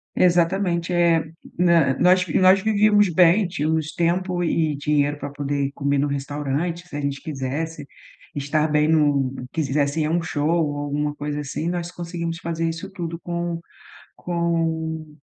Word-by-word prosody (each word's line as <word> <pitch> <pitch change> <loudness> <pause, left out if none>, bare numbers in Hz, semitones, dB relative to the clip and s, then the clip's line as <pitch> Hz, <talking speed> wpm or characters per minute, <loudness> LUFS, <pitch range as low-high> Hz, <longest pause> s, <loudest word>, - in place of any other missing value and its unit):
Exatamente. 175 0 +2
Eh, 170 -2 +4 0.4
hã, 165 -7 +4
nós 180 +1 +4
nós 190 +1 +5
vivíamos 210 -1 +4
bem, 180 +4 +4
tínhamos 160 -1 -1
tempo 175 +1 0
e 165 - +1
e - - -4
dinheiro 145 0 +1
pra 145 0 -6
poder 140 -1 -2
comer 140 0 0
no 145 - +1
restaurante 145 +5 -3
se 145 - -10
a 145 - -3
gente 140 -1 -3
quisesse, 150 +2 -4 0.5
estar 150 +2 0
bem 150 0 +2
no 145 -4 +2 0.2
quisesse 145 0 0
ir - - +1
a 170 +2 +1
show 155 -1 -1
ou 155 -4 +1
alguma 145 +1 -2
coisa 145 0 -4
assim 150 +3 -4
nós 175 0 -3
conseguimos 170 -1 -5
fazer 165 0 -2
isso 165 +4 -6
tudo 170 -3 -5
com 170 -1 -3 0.6
com 160 -2 -2
160 Hz, 155 wpm, -22 LUFS, 145-175 Hz, 0.6 s, nós